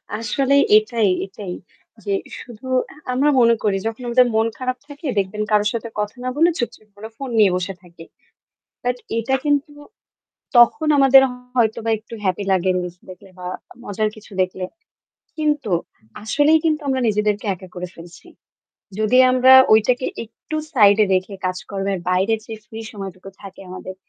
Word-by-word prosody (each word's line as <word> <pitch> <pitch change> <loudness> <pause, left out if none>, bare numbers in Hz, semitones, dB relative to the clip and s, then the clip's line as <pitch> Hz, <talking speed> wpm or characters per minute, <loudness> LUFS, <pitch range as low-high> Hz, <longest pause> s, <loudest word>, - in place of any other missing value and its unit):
আসলে 245 +6 0 0.2
এটাই, 215 -1 +1 0.2
এটাই। 195 -1 -8 0.5
যে 200 - -2 0.3
শুধু 240 0 -12 0.5
আমরা 275 +4 +2
মনে 235 -1 +5
করি 205 -3 +1
যখন 225 +2 -5
আমাদের 250 +1 +4
মন 220 +1 +3
খারাপ 255 0 -3
থাকে 290 +2 -11
দেখবেন 200 +2 -1
কারো 210 0 +3
সাথে 230 0 -4
কথা 210 +3 -3
না 255 - -1
বলে 330 +4 +4
চুপচুপ 225 -3 -5
করে 215 +2 -9
ফোন 275 -2 -6
নিয়ে 200 -3 +5
বসে 185 +2 -3
থাকি। 170 -2 -15 0.8
বাট 245 0 0 0.2
এটা 250 +4 0
কিন্তু 290 0 0 0.8
তখন 240 +6 +5
আমাদের 270 -1 +7 0.3
হয়তোবা 225 -1 +1
একটু 220 +2 -12
হ্যাপি 190 +1 -1
লাগে 185 0 +1
রিলস 180 -1 -4
দেখলে 185 +1 -13
বা 180 - -8 0.4
মজার 215 -1 -1
কিছু 215 0 -15
দেখলে। 185 0 -4 0.7
কিন্তু 295 -7 -1 0.5
আসলেই 290 +8 +3
কিন্তু 310 -1 +1
আমরা 265 -1 0
নিজেদেরকে 210 0 0
একা 185 +1 -13
করে 180 0 -5
ফেলছি। 170 +1 -14 0.7
যদি 220 +4 +3
আমরা 255 +1 +5 0.2
ঐটাকে 245 +4 +3 0.2
একটু 230 +7 -8 0.2
সাইডে 210 -3 +5
রেখে 185 +2 -1
কাজকর্মের 195 +1 -3
বাইরে 190 +5 +2
যে 225 - -6
ফ্রি 220 +1 -9
সময়টুকু 195 -2 -8
থাকে 195 -1 -11
আমাদের 185 0 -8
215 Hz, 150 wpm, -20 LUFS, 195-255 Hz, 0.8 s, আমাদের